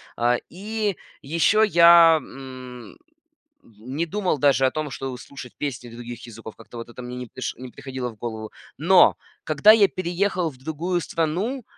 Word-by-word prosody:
А, 120 +1 +2
и 210 +1 -3 0.2
еще 170 +9 +2
я, 170 -3 +7
м, 130 -5 -11
м, - - -22 0.7
не 125 +9 -5
думал 185 -4 -1
даже 135 -1 +3
о 130 - +2
том, 155 -1 -3
чтобы 135 -2 -5
слушать 125 +1 -11
песни 125 -4 -5
других 120 0 -9
языков, 115 -1 -11
как-то 115 +1 -13
вот 115 0 -8
это 120 - -10
мне 125 0 -7
не 125 -1 -6
приш 130 - -5
не 130 0 -9
приходило 130 0 -6
в 115 - -13
голову. 110 -1 -6 0.3
Но 180 +4 +5 0.3
когда 155 +7 +5
я 215 -2 +6
переехал 185 -1 -1
в 135 - -15
другую 160 +6 -2
страну, 180 - -2
140 Hz, 170 wpm, -23 LUFS, 125-170 Hz, 0.7 s, я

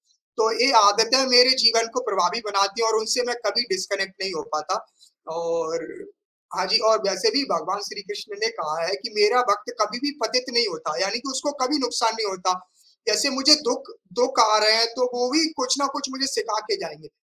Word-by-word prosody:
तो 225 - -3 0.2
ए - - +4
आदतें 225 +6 +4
मेरे 245 +1 +8
जीवन 230 0 +5
को 250 - -1
प्रभावी 190 +3 0
बनाती 200 +2 0
हैं 225 - +2
और 220 -1 +1
उनसे 220 +3 0
मैं 240 - -2
कभी 205 +3 +2
डिस्कनेक्ट 190 0 -3
नहीं 190 0 -3
हो 155 - -5
पाता 150 0 -3 0.6
और 165 -1 -3 0.7
हाँ - - -1
जी - - +5
और 220 0 +4
वैसे 195 +3 +1
भी - - +2
भगवान - - -3
श्री 400 +1 -7
कृष्ण 415 0 -9
ने 470 - +1
कहा 155 +1 -4
है 190 - -1
कि 235 - -5
मेरा 210 +4 +4
वक़्त 210 +5 -2
कभी 215 +3 -1
भी 290 - -2
पतित 250 +4 -1
नहीं 235 0 +4
होता। 160 -1 -6
यानी 195 +4 -1
कि 270 - -9
उसको 265 +2 -3
कभी 295 +4 0
नुकसान 240 -3 0
नहीं 220 -2 -2
होता। 185 -1 -2 0.6
जैसे 215 +6 +2
मुझे 275 +3 +6
दुःख 265 +10 -4 0.3
दुःख 255 0 +2
आ 215 -2 +5
रहे 215 +1 +7
हैं 230 +1 +4
तो 250 - +1
वो 245 +1 -1
भी 320 +2 +3
कुछ 260 0 +1
न - - +3
कुछ 285 -2 -5
मुझे 270 0 -1
सिखा 440 +12 -3
के 415 - +1
जाएँगे। - - -12
230 Hz, 215 wpm, -22 LUFS, 200-265 Hz, 0.7 s, मेरे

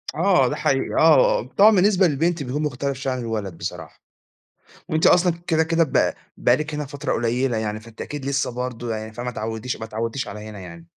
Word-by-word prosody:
آه، - - +3
ده - - -2
حقيقي. - - 0
آه، - - +5
آه، - - -4
طبعًا، 210 +2 +8
بالنسبة 190 -1 +4
للبنت 165 +1 0
بيكون 140 +4 -3
مختلف 140 -1 -2
شوية 135 -1 -2
عن 130 - -4
الولد 105 -7 -4
بصراحة. 85 - -7 0.9
وأنتِ 160 0 +2
أصلًا 180 -1 +5
كدا 160 -2 +2
كدا 165 +1 +2
ب 135 - +1 0.2
بقى 120 - +3
لِك 150 0 -4
هنا 150 -1 -3
فترة 145 +1 -4
قليلة 120 +1 0
يعني، 110 -1 -3
فأنتِ 115 0 -15
أكيد 145 -2 -6
لسه 140 -2 0
برضه، 120 -2 -4
يعني 110 0 -6
فما 120 +2 -5
اتعوديش 110 +2 -4
ما 110 - -7
اتعودتيش 115 +4 -4
على 105 +1 -7
هنا 105 -2 -9
يعني. 85 -2 -11
125 Hz, 200 wpm, -22 LUFS, 110-155 Hz, 0.9 s, طبعًا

